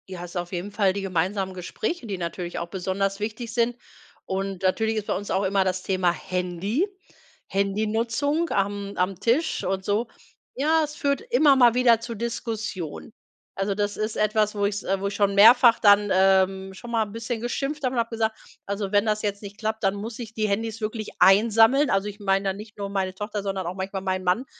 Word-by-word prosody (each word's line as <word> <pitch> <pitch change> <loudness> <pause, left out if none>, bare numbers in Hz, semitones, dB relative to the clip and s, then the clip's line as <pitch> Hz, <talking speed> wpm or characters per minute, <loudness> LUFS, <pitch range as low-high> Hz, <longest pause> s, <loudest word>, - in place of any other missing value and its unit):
Ja, 185 -2 -7
hast 175 0 -9
auf 175 -1 -3
jeden 185 +2 -4
Fall 195 -2 +2
die 200 - -3
gemeinsamen 190 +1 -1
Gespräche, 220 - -4
die 200 -2 -3
natürlich 175 0 -4
auch 170 - -4
besonders 195 +2 -2
wichtig 225 +2 -5
sind. 235 0 +1 0.5
Und 195 0 -3
natürlich 220 +4 +1
ist 210 - -3
bei - - 0
uns 205 - -5
auch 195 - +1
immer 195 0 +2
das 185 0 -2
Thema 185 -2 +1
Handy, 180 - -2 0.6
Handynutzung 225 - 0
am 200 0 -1
am 185 0 -1
Tisch 260 +8 +1
und 190 0 -2
so. 210 +3 0 0.5
Ja, 315 +4 +2
es 300 0 -5
führt 280 -1 0
immer 450 - +4
mal 245 -3 +6
wieder 240 -2 +5
zu 230 0 -6
Diskussionen. 220 -6 -5 0.4
Also 195 +1 -1
das 205 0 -2
ist 215 +1 -2
etwas, 215 0 +1
wo 205 -1 +1
ich's 205 0 -2
äh, 195 0 -1
wo 200 - -1
ich 200 - -4
schon 200 -1 +1
mehrfach 230 +3 +7
dann, 205 -1 +5
ähm, 190 0 +3
schon 235 +5 -10
mal 225 -1 +2
'n 205 - -12
bisschen 230 +1 -4
geschimpft 275 +5 -3
habe 255 0 0
und - - +1
habe 230 0 0
gesagt, 220 -1 -1 0.3
also 200 -1 -3
wenn 205 +1 +4
das 215 -1 0
jetzt 200 -1 -2
nicht 200 -1 -9
klappt, 220 0 -3
dann 195 -1 +3
muss 220 +2 -6
ich 225 -2 -7
die 215 -1 0
Handys 220 +2 -2
wirklich 215 0 -4
einsammeln. 225 +7 +5
Also, 195 +1 +1
ich 205 0 -8
meine 195 0 +1
dann 190 - -2
nicht 210 0 -11
nur 200 -1 -4
meine 190 -2 -2
Tochter, 205 +1 -5
sondern 195 -3 -3
auch 180 - -4
manchmal 190 0 -4
meinen 185 -1 -2
Mann, 185 +8 +1
205 Hz, 210 wpm, -25 LUFS, 195-225 Hz, 0.6 s, mehrfach